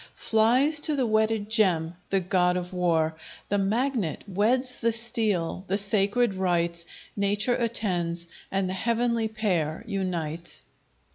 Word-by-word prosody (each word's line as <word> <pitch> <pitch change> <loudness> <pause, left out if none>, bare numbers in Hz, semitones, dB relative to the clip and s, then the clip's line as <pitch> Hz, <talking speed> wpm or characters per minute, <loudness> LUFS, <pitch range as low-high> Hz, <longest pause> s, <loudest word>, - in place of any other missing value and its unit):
Flies 255 +8 +3
to 300 0 +4
the 265 -3 +1
wedded 220 -1 +1
gem 180 -7 +2 0.2
the 195 - +2
God 180 0 +1
of 180 0 -5
War. 165 -3 +1 0.3
The 205 - +1
Magnet 220 - -1
weds 245 +7 +1
the 230 0 +1
Steel: 220 -7 -1
the 195 - 0
sacred 205 +3 +2
rites 170 -2 -1 0.3
Nature 205 +4 +1
attends, 175 -8 0 0.2
and 195 -1 -1
th' 185 - -3
heavenly 230 +2 0
pair 185 -7 -2
unites. 175 -6 -3
200 Hz, 130 wpm, -26 LUFS, 180-230 Hz, 0.3 s, to